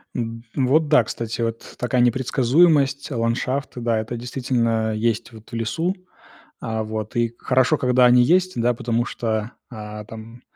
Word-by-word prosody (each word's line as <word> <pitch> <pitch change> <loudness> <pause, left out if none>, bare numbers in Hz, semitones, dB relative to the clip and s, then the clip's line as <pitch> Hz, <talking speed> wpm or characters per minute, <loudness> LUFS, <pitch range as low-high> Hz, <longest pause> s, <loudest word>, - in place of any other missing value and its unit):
М, 115 -1 -4
вот, 145 +4 +2
да, 120 - +5
кстати, 115 +1 -5
вот 115 0 -1
т - - -14
такая 125 0 0
непредсказуемость, 135 +4 +2
ландшафты, 125 +2 -2
да, 115 -2 0
это 115 +2 -4
действительно 115 -3 -1
есть, 115 +2 -1
вот 110 -1 -14
в - - -17
лесу. 165 - -1 0.6
А 110 -1 -3
вот, 110 0 -5
и 120 -1 0
хорошо, 130 +4 +2
когда 125 -1 +3
они 125 0 +6
есть, 185 +8 +3
да, 120 +1 +2
потому 120 0 -1
что, 110 -1 -3 0.2
а, 105 -2 -7
там, 115 +2 -11
120 Hz, 160 wpm, -22 LUFS, 115-130 Hz, 0.6 s, они